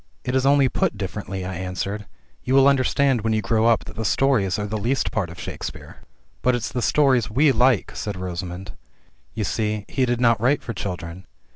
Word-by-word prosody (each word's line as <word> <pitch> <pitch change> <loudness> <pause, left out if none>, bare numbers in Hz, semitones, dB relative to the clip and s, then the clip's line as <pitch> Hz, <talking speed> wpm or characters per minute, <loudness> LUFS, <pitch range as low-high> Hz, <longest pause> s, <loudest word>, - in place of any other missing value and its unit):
"It 125 - -2
is 130 0 +2
only 140 -1 +5
put 115 - -1
differently," 95 -1 -5
I 95 - -4
answered. 95 +3 -4 0.4
"You 130 - +1
will 135 0 +6
understand 135 -2 +2
when 110 +1 0
you 110 -1 0
grow 115 -1 +2
up 115 - +3
that - - -10
the 110 - -3
stories 110 -5 +2
are 105 - -2
the 105 +1 -3
least 125 +6 0
part 100 -6 -1
of 85 - -11
Shakespeare." - - -7 0.4
"But 125 0 +3
it's 110 -3 -3
the 125 +3 -2
stories 130 -4 +3
zve 135 +6 +3
like," 125 0 +2
said 105 -2 -4
Rosamund. 90 0 -5 0.6
"You 110 - -1
see 105 +4 -2
he 130 -2 0
did 120 -1 0
not 115 -3 +3
write 135 +4 +2
for 115 - -5
children." 90 -2 -6
110 Hz, 205 wpm, -23 LUFS, 95-130 Hz, 0.6 s, will